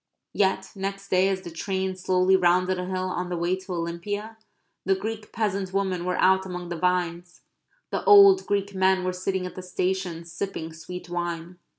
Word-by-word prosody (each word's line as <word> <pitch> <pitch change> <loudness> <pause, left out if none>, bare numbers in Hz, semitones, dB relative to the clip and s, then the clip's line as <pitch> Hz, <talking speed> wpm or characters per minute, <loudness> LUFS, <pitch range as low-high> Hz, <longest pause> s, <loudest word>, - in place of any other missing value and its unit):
Yet 190 -1 +1
next 195 0 -5
day, 185 +1 +3
as 190 -1 -1
the 175 -2 -8
train 190 +2 -2
slowly 185 +1 +3
rounded 180 0 +3
a 180 - -3
hill 185 0 -2
on 180 0 -3
the 175 - -2
way 175 +2 +1
to 190 0 -7
Olympia, 180 +6 -4 0.5
the 195 - +2
Greek 215 +2 -5
peasant 200 -4 -2
women 190 -3 -1
were 180 0 -1
out 190 0 +4
among 180 -2 -6
the 175 - -3
vines; 175 0 -1 0.5
the - - -2
old 400 -3 +8
Greek 200 0 0
men 190 0 +2
were 185 0 -1
sitting 185 0 -2
at 180 - -6
the 185 - -7
stations, 180 -2 -3
sipping 165 -3 -4
sweet 180 +3 -8
wine. 175 0 -4
185 Hz, 185 wpm, -26 LUFS, 175-195 Hz, 0.5 s, old